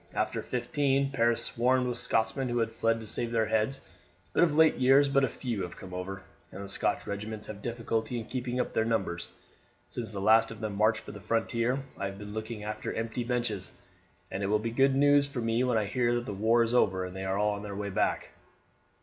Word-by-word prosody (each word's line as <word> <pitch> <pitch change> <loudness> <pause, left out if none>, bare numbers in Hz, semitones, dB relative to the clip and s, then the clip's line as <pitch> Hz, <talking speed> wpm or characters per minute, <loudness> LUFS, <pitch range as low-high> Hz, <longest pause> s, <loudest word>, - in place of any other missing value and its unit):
After - - 0
'15 135 +2 0
Paris 115 -3 +2
swarmed 125 +2 +2
with 125 - -2
Scotsmen 125 +2 0
who 120 - -1
had 115 -1 +1
fled 115 0 +1
to 110 - -8
save 115 +2 -2
their 115 -1 +2
heads; 110 +5 0 0.5
but - - +3
of 160 -4 +2
late 160 0 +6
years 135 +2 +5
but 135 -2 +3
few 115 -4 -4
have 90 -1 -6
come 95 -1 -10
over, 95 +1 -5 0.3
and 100 - -7
the - - -7
Scotch - - 0
regiments 105 +2 -5
have 105 -1 -8
difficulty 115 0 -2
in 115 - -4
keeping 125 0 -3
up - - -1
their 110 - +2
numbers. 95 -7 -1 0.6
Since 115 -4 -5
the 100 - -5
last 110 +3 +5
of 115 - -8
them 105 -2 -3
marched 110 +2 +3
for - - -8
the 105 - -9
frontier 115 +5 0 0.2
I 100 - -1
have 100 0 -7
been 105 0 -8
looking 110 0 -5
after 105 0 -4
empty 115 +2 -3
benches, 120 -6 -2 0.6
and 95 +1 -3
it 100 - 0
will 105 +2 +3
be 115 +2 -3
good 135 +3 +3
news 145 0 +5
for 140 -3 -5
me 115 +1 +1
when 125 -3 +2
I 110 - +1
hear 120 +3 +1
that 120 0 -2
the 105 - -4
war 110 +4 +3
is 115 +1 -1
over 95 -6 +3
and 90 0 -8
they 95 - -4
are 95 +1 -1
on 105 0 0
their 100 -1 -6
way 100 0 -3
back." - - 0
115 Hz, 225 wpm, -29 LUFS, 105-125 Hz, 0.6 s, late